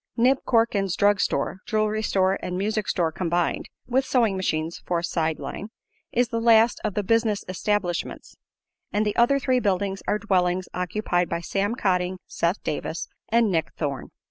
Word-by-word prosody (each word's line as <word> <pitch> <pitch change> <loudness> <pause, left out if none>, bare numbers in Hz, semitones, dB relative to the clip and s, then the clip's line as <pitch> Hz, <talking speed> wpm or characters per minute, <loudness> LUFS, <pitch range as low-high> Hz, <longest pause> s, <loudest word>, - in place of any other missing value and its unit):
Nib 255 +3 +4
Corkins' 215 -6 +2
drug 205 0 +3
store, - - 0
jewelry 215 -1 +1
store 190 -2 +1
and 180 0 -3
music 210 +2 -1
store 165 -3 +1
combined 175 0 -1 0.2
(with 260 +2 +1
sewing 240 -6 +2
machines 165 -3 -2
for 175 - -1
a 170 - -2
"side 160 -2 0
line"), 205 - -6 0.4
is 245 0 +2
the 230 - -1
last 230 0 +5
of 210 -3 -2
the 210 - 0
"business 225 0 +1
establishments," 185 -1 -2 0.6
and 210 +1 +1
the 210 - -1
other 240 +4 +4
three 260 -2 +1
buildings 195 -3 0
are 210 - +2
dwellings 185 -3 +1
occupied 180 -1 -1
by 170 - -1
Sam 200 +5 -1
Cotting, 185 -4 0
Seth 170 +4 -1
Davis 160 +2 -3 0.2
and 230 -2 +3
Nick 165 -3 -1
Thorne. 140 -4 -3
200 Hz, 170 wpm, -25 LUFS, 180-225 Hz, 0.6 s, last